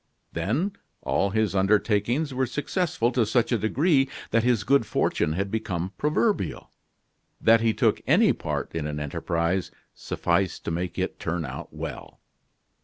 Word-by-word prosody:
Then, 150 - 0 0.3
all 100 - +1
his 110 0 0
undertakings 105 +8 +1
were 130 0 0
successful 160 -4 -1
to 125 -2 +2
such 115 +2 +1
a 120 - +3
degree 135 - +2 0.2
that 115 - +3
his 120 -3 +2
good 140 +3 +4
fortune 75 - 0
had 95 +3 -2
become 95 -4 -3
proverbial. 175 +9 0 0.7
That 115 0 +5
he 115 -1 +3
took - - +2
any - - +5
part - - -4
in 80 -2 -2
an 75 0 -4
enterprise, 85 +5 -1 0.2
sufficed 85 +2 -1
to - - -2
make 90 +2 -3
it - - -2
turn 80 -1 -2
out 65 +1 -7
well. - - -7
110 Hz, 150 wpm, -26 LUFS, 90-130 Hz, 0.7 s, That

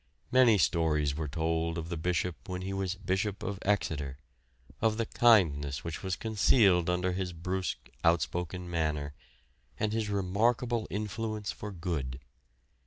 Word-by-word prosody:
Many 125 -4 +6
stories 75 -5 +2
were 75 +1 -3
told 80 +2 -1
of 80 0 -4
the 85 - -2
Bishop 85 -3 -2
when 90 0 -4
he 95 +1 -3
was 95 -2 -1
the 95 - -15
Bishop 100 +1 -1
of 100 0 -3
Exeter; 75 -9 -1 0.6
of 110 -1 +2
the 115 - 0
kindness 75 - +3
which 80 -2 -5
was 95 -2 -2
concealed 100 -4 +3
under 90 +1 +1
his 90 -1 -3
brusque, 90 +2 -3 0.2
outspoken 90 +2 0
manner, 75 -4 -1 0.7
and 105 0 0
his 110 -2 -1
remarkable 110 +4 +1
influence 105 +1 -3
for 105 - -7
good. 80 -8 -3
90 Hz, 145 wpm, -30 LUFS, 80-105 Hz, 0.7 s, Many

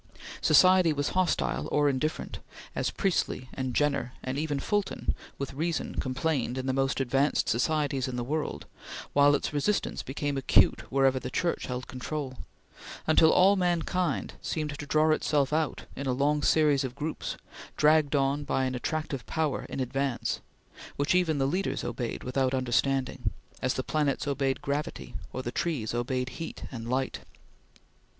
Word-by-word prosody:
Society 185 -3 +6
was 145 0 -1
hostile 185 -2 0
or 145 0 +3
indifferent, 140 +3 -1 0.3
as - - 0
Priestley 170 -9 -1
and 130 -2 -3
Jenner, 140 -4 +1
and 130 0 -3
even 145 -1 -1
Fulton, 205 +3 -1 0.2
with 140 0 -4
reason 165 +3 -2
complained 130 -1 -1
in 130 - -3
the 130 - 0
most 135 +1 +1
advanced 135 +2 +2
societies 140 +1 +1
in 130 - -4
the 120 - -2
world, 150 +5 -3 0.5
while 145 0 +6
its 145 - -2
resistance 150 +8 0
became 140 +1 -3
acute 135 - +3
wherever 135 -1 +3
the - - -5
Church 175 -1 -1
held 125 0 -4
control; 130 +1 -5 0.7
until 160 0 +6
all 195 +2 +6
mankind 175 -3 0
seemed 150 -2 -2
to - - -5
draw 155 +2 +3
itself 150 -2 +1
out 155 -1 0
in 140 - -4
a 130 - +2
long 145 +3 +2
series 145 -3 +4
of 130 -1 -4
groups, 150 +2 -4 0.4
dragged 150 -1 +4
on 140 +1 +1
by 135 -2 0
an 130 - -1
attractive 140 0 -3
power 160 -3 -1
in - - -5
advance, 135 0 -1 0.5
which 145 +3 +1
even 175 -4 +2
the 135 - +2
leaders 180 +8 -1
obeyed 120 0 -3
without 130 +1 0
understanding, 130 -2 0 0.3
as 130 -1 0
the 130 - -1
planets 150 -1 0
obeyed 135 -1 0
gravity, 145 +1 -3 0.2
or 130 - -4
the 120 - -3
trees 135 -11 -1
obeyed 125 +1 -1
heat 165 - -6
and 115 -3 -6
light. 130 +1 -1
140 Hz, 160 wpm, -28 LUFS, 130-155 Hz, 0.7 s, Society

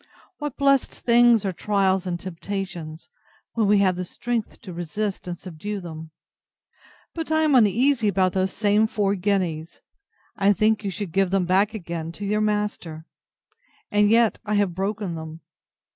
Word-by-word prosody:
What 295 -3 -5
blessed 275 -1 +3
things 235 -2 +4
are 190 - -1
trials 195 -1 +1
and 175 -1 -2
temptations, 175 -3 -6 0.5
when 220 -3 +1
we 205 +1 +5
have 185 -2 +3
the 180 - -3
strength 235 +4 -4
to 185 - -9
resist 180 +4 -4
and 175 -1 -4
subdue 190 +5 -6
them! 160 -3 -8 1.0
But 325 -1 -5
I 315 0 +3
am 310 -2 +3
uneasy 235 +1 +3
about 185 -2 +2
those 190 0 0
same 210 +1 +2
four 205 -3 0
guineas; 180 -5 -2 0.6
I 200 0 +3
think 215 +1 +1
you 200 - -2
should 195 -1 -5
give 195 +1 +2
them 190 -1 +1
back 195 +4 +2
again 170 -4 -5
to 205 - -6
your 210 +1 0
master; 210 -7 -2 0.9
and 205 0 +4
yet 230 0 +3
I 210 -1 -1
have 200 -3 +1
broken 195 0 -3
them. 160 0 -8
200 Hz, 160 wpm, -24 LUFS, 180-215 Hz, 1.0 s, we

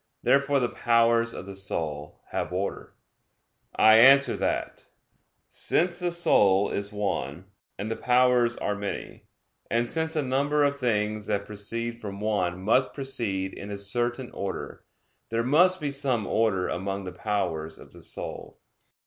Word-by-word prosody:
Therefore 140 0 +3
the 125 - +1
powers 115 0 +2
of - - -7
the 100 0 -8
soul 80 -6 -3
have - - -3
order. 95 +2 -4 0.8
I 110 0 +7
answer 135 +1 +7
that, - - -3 0.6
Since 175 +1 0
the 175 -1 -1
soul 100 - +3
is 100 +1 -3
one, 95 -6 -3 0.3
and 105 +3 -4
the - - -1
powers 125 -1 +3
are 105 - -1
many; 100 -1 -6 0.4
and 120 +1 +1
since 160 +3 -1
a 155 - +1
number 140 +3 +1
of 140 0 0
things 105 -3 -1
that 100 0 -1
proceed 115 +3 -5
from 100 -2 -6
one 95 -4 -1
must 125 +6 +2
proceed 115 -9 -1
in 100 - -8
a 100 - -4
certain 120 +5 -2
order; 100 -1 -6 0.5
there 115 +1 0
must 180 +8 +4
be 145 -3 -2
some 130 -6 0
order 105 -5 +1
among 95 +2 -3
the 90 - -6
powers 90 -6 -3
of - - -15
the - - -14
soul. - - -6
115 Hz, 150 wpm, -26 LUFS, 100-130 Hz, 0.8 s, I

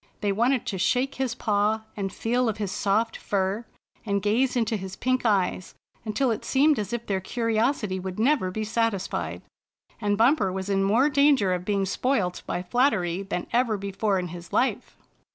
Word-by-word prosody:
They 205 - +1
wanted 240 +5 +1
to 190 - -3
shake 250 +9 +1
his 250 -3 -1
paw 215 -1 +1
and 195 -2 -3
feel 240 +3 0
of 215 - -3
his 205 -3 -3
soft 215 +4 0
fur, 200 +3 -2 0.4
and 200 -2 0
gaze 230 +6 +1
into 230 -2 +1
his 190 -2 -6
pink 255 -1 0
eyes, 190 -3 0 0.3
until 230 +4 +1
it 220 - -3
seemed 290 +1 +3
as 210 - -3
if 235 -1 -3
their 195 -2 -1
curiosity 225 -2 0
would 185 0 -6
never 230 -4 +2
be 215 +4 -3
satisfied. 220 -3 -2 0.6
And 205 -2 0
Bumper 230 -4 +3
was 190 +1 -4
in 195 0 +2
more 235 +9 +3
danger 280 -9 +4
of 180 0 -3
being 200 -1 +1
spoilt 190 -3 0
by 180 - -2
flattery 190 -5 +1
than 190 -3 -4
ever 235 -3 +2
before 200 +1 -1
in 180 -1 -3
his 170 0 -9
life! 260 - 0
210 Hz, 180 wpm, -26 LUFS, 190-240 Hz, 0.6 s, danger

